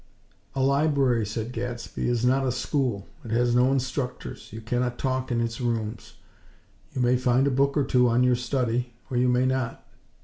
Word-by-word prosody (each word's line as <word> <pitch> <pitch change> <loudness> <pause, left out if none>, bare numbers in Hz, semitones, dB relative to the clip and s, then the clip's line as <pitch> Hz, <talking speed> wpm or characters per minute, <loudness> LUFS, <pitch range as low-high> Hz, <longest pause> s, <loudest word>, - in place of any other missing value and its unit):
"A 135 - +1
library," 140 -5 +2
said 110 +2 -4
Gadsby, 120 0 -4
"is 120 0 +1
not 135 +2 +3
a - - +1
school. 125 -5 -1 0.2
It 115 - -8
has 120 +2 +2
no 125 +2 +4
instructors; 130 -1 -3
you 110 - -7
cannot 120 +2 -1
talk 130 -1 -1
in 120 - +1
its 115 +1 -3
rooms. 115 -2 -3 0.8
You 130 - 0
may 125 +1 +4
find 125 +1 +2
a 140 - +2
book 140 +3 +2
or 145 - +3
two 125 -2 +3
on 120 +2 +3
your 125 -1 +4
study, 120 -1 -1 0.2
or 125 - 0
you 125 +1 +3
may 125 +1 +3
not. 130 -2 -2
125 Hz, 190 wpm, -26 LUFS, 120-130 Hz, 0.8 s, no